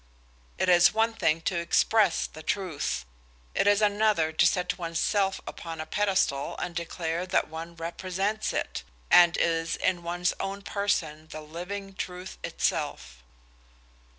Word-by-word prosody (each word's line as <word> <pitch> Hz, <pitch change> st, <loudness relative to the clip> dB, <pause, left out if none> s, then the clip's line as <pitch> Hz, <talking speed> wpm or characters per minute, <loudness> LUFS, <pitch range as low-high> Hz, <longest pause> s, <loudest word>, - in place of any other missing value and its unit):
It -, -, 0 dB
is 175 Hz, -1 st, +6 dB
one 225 Hz, +1 st, +2 dB
thing 165 Hz, -6 st, +1 dB
to 170 Hz, +1 st, -1 dB
express 190 Hz, +3 st, +3 dB
a 155 Hz, -, -9 dB
truth, 155 Hz, -, -2 dB, 0.5 s
it -, -, +1 dB
is 205 Hz, +1 st, +4 dB
another 205 Hz, -6 st, +2 dB
to 170 Hz, +2 st, +4 dB
set 180 Hz, +1 st, 0 dB
one's 165 Hz, -1 st, -3 dB
self 195 Hz, -2 st, +1 dB
upon 165 Hz, -1 st, -7 dB
a 155 Hz, -, -3 dB
pedestal 190 Hz, -10 st, 0 dB
and 175 Hz, -, -4 dB
declare 170 Hz, 0 st, -3 dB
that 185 Hz, -, +1 dB
one 165 Hz, +2 st, -7 dB
represents 185 Hz, +5 st, -2 dB
it, -, -, -3 dB, 0.3 s
and 175 Hz, -1 st, +7 dB
is 165 Hz, -1 st, +1 dB
in 185 Hz, -2 st, 0 dB
one's 175 Hz, +1 st, -1 dB
own 195 Hz, +1 st, -4 dB
person 160 Hz, -7 st, -1 dB
the 155 Hz, -, -8 dB
living 185 Hz, +6 st, -6 dB
truth 185 Hz, 0 st, -6 dB
itself. 65 Hz, -1 st, -2 dB
175 Hz, 145 wpm, -28 LUFS, 165-195 Hz, 0.5 s, and